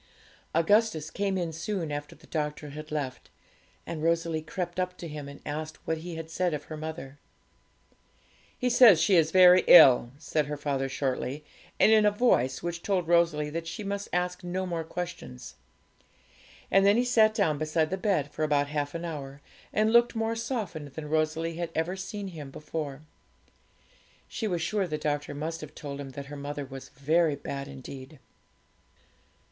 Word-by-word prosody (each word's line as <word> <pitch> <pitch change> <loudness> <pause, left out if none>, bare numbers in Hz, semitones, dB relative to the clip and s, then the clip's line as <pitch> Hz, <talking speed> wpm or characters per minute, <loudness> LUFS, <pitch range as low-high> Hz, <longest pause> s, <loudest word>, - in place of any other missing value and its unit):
Augustus 165 -2 +2
came 195 -1 -1
in 170 -3 -2
soon 170 -1 -3
after 145 0 -5
the 160 - -19
doctor 150 -2 -4
had 155 +1 -8
left; 140 -4 -4 0.6
and 165 -2 -5
Rosalie 165 -1 +1
crept 175 +3 -4
up 180 0 -2
to 170 - -7
him, 150 -2 -7
and 140 - -11
asked 155 +1 -5
what 160 0 -1
he 170 +1 -7
had 165 0 -6
said 170 0 -1
of 150 - -6
her 155 - -8
mother. 155 -3 -7 1.4
'He 250 - -1
says 240 -7 +7
she 185 +4 +4
is 160 -2 +4
very 180 +1 +7
ill,' 130 -8 +9
said 150 -1 -1
her 150 0 -4
father 140 -2 -2
shortly, 135 +2 -3 0.3
and - - +6
in 215 -1 +6
a 210 - +6
voice 150 - +1
which 170 0 -3
told 185 -4 0
Rosalie 165 -3 +2
that 165 +1 -4
she 210 +6 -5
must 200 0 -4
ask 180 0 -1
no 180 +1 -2
more 170 -2 -3
questions. 170 - -7 1.2
And 195 +1 +5
then 200 +2 +5
he 245 - +2
sat 220 -3 +4
down 160 -9 +1
beside 155 +1 0
the - - +1
bed 185 -7 0
for - - -7
about 145 -2 +2
half 145 0 -2
an 170 +1 -4
hour, 140 -4 -6 0.3
and 215 +1 +2
looked 235 0 +5
more 225 0 -1
softened 205 - -4
than 150 -2 -7
Rosalie 160 +1 0
had 170 -1 -3
ever 165 +3 -1
seen 195 +1 -5
him 155 -6 -8
before. 150 0 -6 1.2
She 220 - -3
was 175 -4 -1
sure 195 +2 0
the 155 -2 -2
doctor 145 -1 -2
must 160 +3 -4
have 155 0 -10
told 145 -2 -6
him 135 - -7
that 140 +1 -7
her 145 +1 -9
mother 145 0 -5
was 135 0 -10
very 155 +3 +1
bad 140 0 -6
indeed. 135 +2 -10
160 Hz, 180 wpm, -28 LUFS, 145-180 Hz, 1.4 s, ill